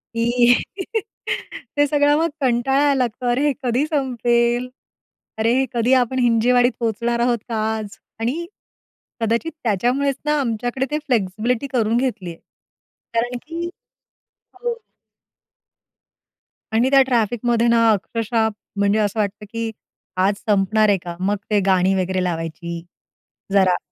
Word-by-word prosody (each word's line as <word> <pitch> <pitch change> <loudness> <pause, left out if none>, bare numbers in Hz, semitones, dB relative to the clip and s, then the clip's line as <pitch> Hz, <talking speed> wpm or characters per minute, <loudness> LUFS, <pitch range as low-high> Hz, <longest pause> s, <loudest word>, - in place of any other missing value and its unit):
की 240 +1 +4 1.2
ते 290 - +5
सगळं 290 0 +3
मग 330 +1 +1
कंटाळायला 270 +3 +2
लागतो 250 -1 -1
अरे 275 +5 +2
हे 290 - +2
कधी 250 +3 +1
संपेल, 245 -4 +1 0.7
अरे 225 +2 +2
हे 265 - +2
कधी 240 +2 +2
आपण 255 +2 -1
हिंजेवाडीत 245 +1 +4
पोहोचणार 235 +1 -1
आहोत 240 0 +2
का 230 - -2 0.2
आज 210 -2 -7 0.2
आणि 260 +10 -2 0.8
कदाचित 230 +8 0
त्याच्यामुळेच 250 +6 +1
ना 300 0 +2
आमच्याकडे 245 +1 -1
ते 300 - 0
फ्लेक्सिबिलिटी 230 +2 0
करून 235 -4 +1
घेतली 235 -8 -2
आहे. 165 - -13 0.7
कारण 240 +2 0
की 340 +2 -4 0.9
हो 480 -1 0 2.0
आणि 245 +4 +3
त्या 275 -1 +7
ट्रॅफिकमध्ये 240 -1 +1
ना 230 -1 +4
अक्षरशः 220 +2 0 0.3
म्हणजे 200 +1 +2
असं 210 0 0
वाटतं, 205 0 -2
की 230 -1 -2 0.6
आज 200 - +2
संपणार 210 +1 +3
आहे 200 -1 +3
का? 175 -1 -8
मग 200 +2 +1
ते 210 -1 +3
गाणी 185 0 +3
वगैरे 185 0 0
लावायची 170 0 -4 0.7
जरा. 190 -2 +4
235 Hz, 130 wpm, -21 LUFS, 210-255 Hz, 2.0 s, त्या